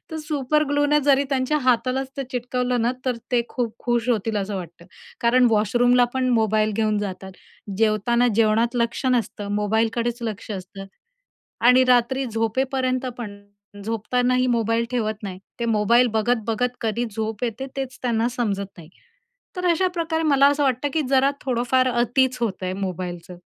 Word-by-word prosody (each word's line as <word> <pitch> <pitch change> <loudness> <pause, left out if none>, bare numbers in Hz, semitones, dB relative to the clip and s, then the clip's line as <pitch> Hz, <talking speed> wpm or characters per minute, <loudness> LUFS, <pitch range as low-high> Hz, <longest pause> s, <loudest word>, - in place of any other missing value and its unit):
तर 320 - -5
सुपरग्लूने 290 +1 +1
जरी 280 0 +4
त्यांच्या 270 +2 +1
हातालाच 255 +1 0
ते 275 - -3
चिटकवलं 250 -1 -1
ना, 240 +2 +1
तर 255 -2 0 0.2
ते 240 -1 +3
खूप 235 -3 -3
खुश 240 -1 -1
होतील 225 -2 0
असं 200 0 -2
वाटतं. 170 -1 -9 0.3
कारण 245 +1 +4
वॉशरूमला 245 +3 +3
पण 260 -1 0
मोबाईल 220 -2 +2
घेऊन 215 -2 +1
जातात, 190 -1 -5 0.5
जेवताना 225 +3 +2
जेवणात 230 +2 +2
लक्ष 235 +3 -1
नसतं, 210 -4 -1
मोबाईललकडेच 225 +3 0
लक्ष 225 -1 -5
असतं 195 0 -7 0.8
आणि 255 +1 +6
रात्री 250 +2 +3
झोपेपर्यंत 255 +3 -1
पण, 205 -4 -7 0.5
झोपतानाही 250 +3 0
मोबाईल 230 -1 +1
ठेवत 220 -3 -1
नाही. 190 -3 -6 0.2
ते - - 0
मोबाईल 230 +3 +3
बघत-बघत 230 +2 0
कधी 230 +2 -1
झोप 220 +1 -3
येते 240 +3 -4
तेच 270 0 -5
त्यांना 235 -2 +1
समजत 210 -5 -2
नाही. 160 -2 -12 0.7
तर 360 - -2
अशा 370 +3 +2
प्रकारे 325 -1 -1
मला 280 -2 +5
असं 290 0 +1
वाटतं 265 +1 +1
की 315 - +1
जरा 270 0 +4
थोडंफार 255 0 +1
अतीच 250 +2 +1
होतंय 190 -5 -2
मोबाईलचं. 180 -2 -5
240 Hz, 150 wpm, -23 LUFS, 215-255 Hz, 0.8 s, आणि